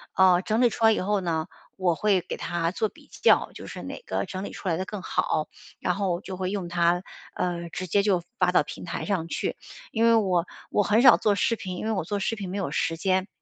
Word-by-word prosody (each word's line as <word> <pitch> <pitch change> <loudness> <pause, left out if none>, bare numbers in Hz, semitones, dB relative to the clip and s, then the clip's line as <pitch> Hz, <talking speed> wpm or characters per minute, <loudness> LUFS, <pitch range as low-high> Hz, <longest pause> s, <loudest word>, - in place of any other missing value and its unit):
呃， 185 -1 +5
整 220 +3 +1
理 240 - +5
出 225 - 0
来 220 - +7
以 - - +1
后 205 +2 +1
呢， 165 -2 -1 0.3
我 180 -3 +1
会 200 -2 +2
给 - - -6
它 170 -1 -1
做 215 +4 -1
比 - - -20
较， - - +5
就 - - -9
是 - - -7
哪 - - -6
个 - - -2
整 190 +1 -5
理 - - -5
出 190 - -5
来 165 - +1
的 185 - -2
更 210 -1 -6
好， 155 -3 0 0.3
然 180 - 0
后 190 -3 -1
就 185 -1 -7
会 185 0 -2
用 195 -4 -3
它， 175 +1 +2 0.3
呃， 170 -1 -2
直 180 +2 -5
接 200 +4 +2
就 190 -4 +2 0.2
发 180 -1 +3
到 180 - +5
平 - - -7
台 170 - -4
上 185 -5 -1
去。 - - -3 0.3
因 225 - 0
为 230 - +6
我 185 -6 +2 0.2
我 205 - +2
很 210 +4 +3
少 250 -2 +8
做 210 - +2
视 230 +3 +1
频， 185 -4 -6
因 - - -4
为 - - +1
我 200 - -1
做 200 +5 -2
视 225 +3 -1
频 200 -3 -6
没 200 - -3
有 180 - -2
时 165 +2 0
间。 185 +2 +1
185 Hz, 275 characters per minute, -26 LUFS, 175-205 Hz, 0.3 s, 少